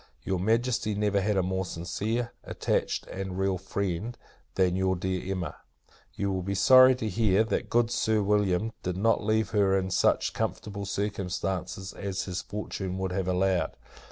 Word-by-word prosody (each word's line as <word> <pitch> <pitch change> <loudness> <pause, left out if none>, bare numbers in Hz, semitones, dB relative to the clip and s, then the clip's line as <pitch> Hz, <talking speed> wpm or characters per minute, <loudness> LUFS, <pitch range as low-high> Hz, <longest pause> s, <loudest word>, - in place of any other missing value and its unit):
Your 95 -2 -1
Majesty 115 +1 +1
never 105 -1 +1
had 105 +1 +1
a 95 - +3
more 95 +1 -1
sincere, 105 +7 -3
attached, - - -1
and 95 -1 -5
real 95 -1 0
friend, 100 +4 -3 0.4
than 90 -2 +2
your 95 0 +1
dear 95 +1 -2
Emma. 90 -5 -3 0.6
You 100 -1 -1
will 95 -1 -1
be 100 +2 -2
sorry 130 +4 +7
to 125 -3 -3
hear, 105 0 +3
that 110 - -2
good 120 0 +2
Sir 110 -2 +1
William 105 +1 +1
did 90 0 -3
not 115 +2 +2
leave 110 0 +1
her 100 -2 +3
in 95 0 -2
such - - +2
comfortable 100 -1 -3
circumstances 95 -2 -3
as 100 -1 -3
his 90 -1 -3
fortune 95 -3 -5
would 95 -1 -2
have 95 0 -1
allowed. 90 -2 +1
95 Hz, 165 wpm, -28 LUFS, 95-105 Hz, 0.6 s, sorry